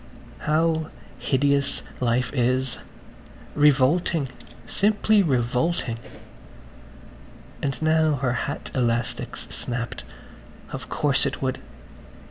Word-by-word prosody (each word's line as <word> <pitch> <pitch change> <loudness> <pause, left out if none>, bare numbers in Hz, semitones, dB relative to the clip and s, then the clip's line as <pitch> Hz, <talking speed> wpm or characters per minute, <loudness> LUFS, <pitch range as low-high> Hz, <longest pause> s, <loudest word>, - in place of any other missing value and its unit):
How 160 +1 +1 0.3
hideous 140 0 +1 0.2
life 125 0 +1
is–revolting, 135 +4 0 0.4
simply 210 - +3
revolting.... 125 -2 0 1.6
And 140 -1 -2
now 155 -1 +3
her 130 -2 0
hat 140 +4 -3
elastic's 120 -2 -1
snapped. 120 -1 -4 0.7
Of - - -6
course 145 -3 +2
it - - -4
would. 130 0 -1
140 Hz, 80 wpm, -24 LUFS, 125-160 Hz, 1.6 s, simply